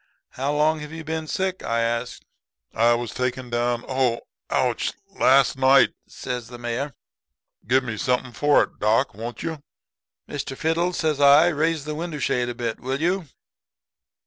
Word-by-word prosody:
"'How 135 +3 -2
long 155 +2 +2
have 150 0 -8
you 160 0 -7
been 160 0 -4
sick?' 190 +2 -2
I 115 0 0
asked. 115 +1 -2 0.5
"'I 120 +1 +4
was 120 -1 -4
taken 125 -1 -3
down 120 0 0
ow 130 -3 +1 0.3
ouch - - 0 0.2
last 135 0 +4
night,' 135 +1 +5
says 125 -2 -5
the 120 +1 -10
Mayor. 120 +3 -3 0.7
'Gimme 125 -3 +1
something 125 -2 0
for 145 +3 +4
it, - - -9
doc, 110 +6 +2
won't 115 +4 -7
you?' 160 -3 -4 0.7
"'Mr. 135 -2 -5
Fiddle,' 170 +3 0
says 155 -4 0
I, 145 +4 +7
'raise 160 -1 0
the 150 - -3
window 160 0 -4
shade 125 -3 0
a 120 - -5
bit, 115 -1 -3
will 130 +2 -3
you?' 175 +1 0
135 Hz, 160 wpm, -24 LUFS, 120-155 Hz, 0.7 s, I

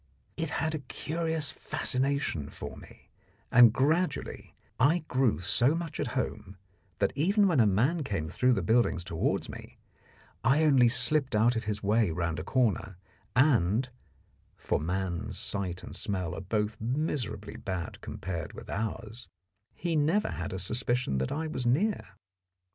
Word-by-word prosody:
It 165 -2 -2
had 160 0 0
a 155 - -2
curious 160 +2 -2
fascination 130 - -1
for - - -8
me, - - -15 0.4
and 120 -2 +8
gradually 160 +9 -1 0.2
I 155 +6 +3
grew 130 - +2
so 120 - +2
much 165 -2 -5
at - - -2
home, 95 0 -3 0.4
that 100 - +1
even 195 +8 +3
when 165 -7 +2
a 110 - +6
man 130 - +2
came 95 - -2
through 125 +9 +2
the - - 0
buildings 115 -6 +2
towards 85 -2 -1
me, - - -10 0.7
I 135 +7 +4
only 135 -5 +5
slipped 130 +2 +3
out 115 +3 +4
of 115 -1 -2
his 105 0 -3
way 105 0 +3
round 85 -1 -2
a - - -4
corner, 105 -4 0 0.4
and 125 - +3 0.7
for - - -1
man's 90 +2 -3
sight 95 -3 -3
and - - -8
smell 95 -5 -3
are 90 - -5
both 105 +3 -2
miserably 115 -5 -2
bad 95 -3 -5
compared 85 -4 -5
with - - -9
ours 110 +2 -4 0.5
he 170 -2 -2
never 160 +8 +2
had - - -4
a 95 - -3
suspicion 115 - 0
that 65 - -2
I 160 +2 -2
was 130 -6 -3
near. 150 - 0
120 Hz, 155 wpm, -29 LUFS, 95-145 Hz, 0.7 s, and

